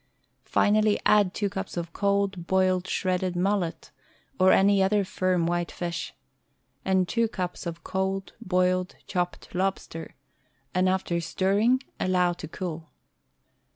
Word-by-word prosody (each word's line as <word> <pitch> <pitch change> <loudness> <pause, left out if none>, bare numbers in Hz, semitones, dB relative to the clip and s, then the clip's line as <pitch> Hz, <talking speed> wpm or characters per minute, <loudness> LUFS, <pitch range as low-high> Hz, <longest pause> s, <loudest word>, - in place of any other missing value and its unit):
Finally 210 0 +3
add 205 -3 +5
two 205 +1 -1
cups 195 -1 -5
of 170 -1 -4
cold, 200 -3 0
boiled, 185 -1 +2
shredded 185 -1 -1
mullet, 185 -2 -1 0.5
or 185 0 +6
any 200 0 +5
other 200 +1 +2
firm 185 -2 0
white 175 0 -1
fish, 170 -1 -4 0.7
and 190 -1 +2
two 230 +3 +1
cups 180 -5 -4
of 170 0 -6
cold, 190 0 -2
boiled, 185 0 +1
chopped 180 -1 -3
lobster, 185 -3 -3 0.6
and 185 +1 +3
after 180 -2 0
stir 190 +4 0
ring, 250 +5 +3 0.2
allow 180 -1 +2
to 170 -2 -8
cool. 165 -1 -6
185 Hz, 130 wpm, -26 LUFS, 175-195 Hz, 0.7 s, or